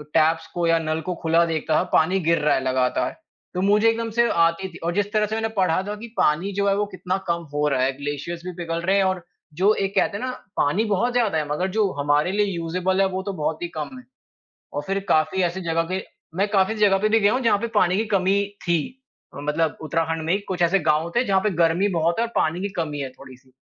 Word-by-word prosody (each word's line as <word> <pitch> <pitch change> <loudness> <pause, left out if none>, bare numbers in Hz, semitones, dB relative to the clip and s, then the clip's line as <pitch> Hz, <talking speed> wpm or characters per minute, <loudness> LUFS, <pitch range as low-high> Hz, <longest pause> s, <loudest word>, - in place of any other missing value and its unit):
Tapes 160 +1 +3
को 175 -1 -1
या 165 0 +4
नल 160 0 -2
को 180 +3 -4
खुला 165 +1 +4
देखता 160 -1 -1
था - - +1
पानी 180 +5 +3
गिर 165 -1 +2
रहा 150 - +4
है - - 0
लगातार। 130 -1 0 0.4
तो 180 - -2
मुझे 210 +3 +4
एकदम 230 0 -1
से 235 0 +4
आती 170 +3 +2
थी 180 - -12
और 170 +1 -1
जिस 205 0 0
तरह 215 -1 +3
से 215 +1 -3
मैंने 225 0 -1
पढ़ा 185 -2 +2
था 210 - -3
कि 220 +3 -9
पानी 170 +7 +2
जो 200 0 +1
है 195 - +2
वो 210 - +1
कितना 185 +1 -2
कम 170 0 0
हो 150 0 +1
रहा 135 -3 +1
है। 130 - +2
ग्लेशियरज़ 145 +4 -5
भी 180 - -4
पिघल 165 0 -3
रहे 190 +3 +2
हैं 195 - +4
और 185 -2 -1 0.4
जो 205 +3 +5
एक 195 -1 -2
कहते 200 - +2
हैं 245 - -6
ना 255 - -2 0.3
पानी 170 +10 +2
बहुत 220 +4 0
ज़्यादा 225 -9 +1
है 150 - -1
मगर 180 +5 0
जो 205 -3 +2
हमारे 145 +4 +2
लिए 205 +1 +2
यूज़ेबल 180 +3 0
है 195 - +4
वो 190 0 -3
तो 200 0 -4
बहुत 155 -2 -2
ही - - -1
कम 155 - -5
है। 255 - -11 0.7
और 145 - -3
फिर 195 +1 -1
काफ़ी 155 +4 +2
ऐसी 175 +1 -1
जगह 165 -1 0
के 190 0 -1 0.3
मैं 200 +2 +1
काफ़ी 200 +1 +2
ऐसी 215 - -7
जगह 195 -1 +3
पे 215 +2 +1
भी 225 +1 +3
गया 205 0 +4
हूँ 255 - +1
जहाँ 230 -4 +3
पे 235 - -2
पानी 180 -2 +3
की 220 - +1
कमी 190 +1 +3 0.2
थी। 170 -1 +2 0.6
अ, - - -9
मतलब 150 +2 0
उत्तराखंड 165 +1 -1
में 165 - 0
ही 195 - +2
कुछ 180 -2 -1
ऐसे 170 +3 +4
गाँव 155 +3 +1
थे 240 - +4
जहाँ 195 -4 +2
पे 210 - 0
गर्मी 170 +5 +2
बहुत 165 +3 +1
है 230 - +2
और - - -12
पानी 160 +3 +1
की 200 - -2
कमी 155 -4 -2
है 135 - -3
थोड़ी-सी। 130 0 -15
180 Hz, 260 wpm, -23 LUFS, 160-200 Hz, 0.7 s, जो